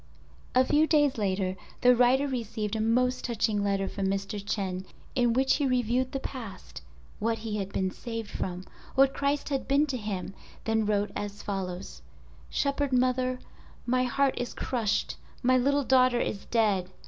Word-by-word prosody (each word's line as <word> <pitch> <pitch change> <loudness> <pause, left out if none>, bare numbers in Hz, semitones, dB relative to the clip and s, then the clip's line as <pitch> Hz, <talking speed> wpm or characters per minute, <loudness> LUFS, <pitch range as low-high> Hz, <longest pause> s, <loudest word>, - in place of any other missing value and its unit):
A 255 +1 +6
few 300 +4 +3
days 290 -6 +3
later 190 -2 0 0.3
the 250 0 +6
writer 255 +4 +4
received 225 -4 -3
a 220 - 0
most 250 +3 +2
touching 220 -3 0
letter 195 -1 0
from 195 -1 -2
Mr. 195 +1 -2
Chen 190 -3 -2 0.3
in 245 -2 +3
which 265 +2 +3
he 285 -2 +1
reviewed 250 0 +1
the 270 - -2
past—what 225 -1 -6
he 215 -1 -4
had 195 -1 -3
been 190 -1 -1
saved 230 0 -6
from—what 190 +9 -1
Christ 280 +1 -1
had 275 -2 -2
been 280 +2 +4
to 270 -4 -3
him—then 210 +1 -3
wrote 205 -1 +1
as 205 0 -5
follows— 180 - -4 0.5
"Shepherd 280 0 0
Mother—My 255 0 -1
heart 275 +2 +2
is 245 - -4
crushed, 225 -4 -1 0.3
my 255 +1 +4
little 280 +3 +3
daughter 255 -2 +4
is 200 - -2
dead. 205 -6 +1
235 Hz, 150 wpm, -28 LUFS, 200-255 Hz, 0.5 s, A